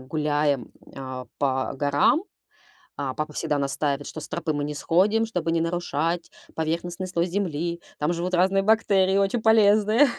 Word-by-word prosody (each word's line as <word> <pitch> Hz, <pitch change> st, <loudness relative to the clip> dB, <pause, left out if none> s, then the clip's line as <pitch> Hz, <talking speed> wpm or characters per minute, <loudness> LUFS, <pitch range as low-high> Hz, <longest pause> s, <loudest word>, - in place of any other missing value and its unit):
гуляем, 145 Hz, -1 st, -1 dB, 0.2 s
а, 130 Hz, -2 st, -7 dB
по 130 Hz, -2 st, 0 dB
горам, 145 Hz, -, +3 dB, 0.7 s
а, 135 Hz, -2 st, -2 dB
папа 155 Hz, 0 st, -4 dB
всегда 150 Hz, -2 st, -1 dB
настаивает, 140 Hz, +1 st, -1 dB
что 155 Hz, -, -7 dB
с -, -, -9 dB
тропы 155 Hz, -, -2 dB
мы 145 Hz, 0 st, -1 dB
не 150 Hz, -, -4 dB
сходим, 200 Hz, +10 st, +2 dB
чтобы 180 Hz, -7 st, -2 dB
не 165 Hz, -, +1 dB
нарушать 165 Hz, 0 st, -1 dB, 0.2 s
поверхностный 170 Hz, +3 st, -3 dB
слой 175 Hz, -1 st, 0 dB
земли. 170 Hz, -2 st, -2 dB, 0.2 s
Там 150 Hz, +3 st, 0 dB
живут 175 Hz, +2 st, -3 dB
разные 190 Hz, +2 st, +3 dB
бактерии, 195 Hz, -3 st, +3 dB
очень 200 Hz, +4 st, +1 dB
полезные. 220 Hz, +3 st, +5 dB
170 Hz, 155 wpm, -25 LUFS, 145-195 Hz, 0.7 s, полезные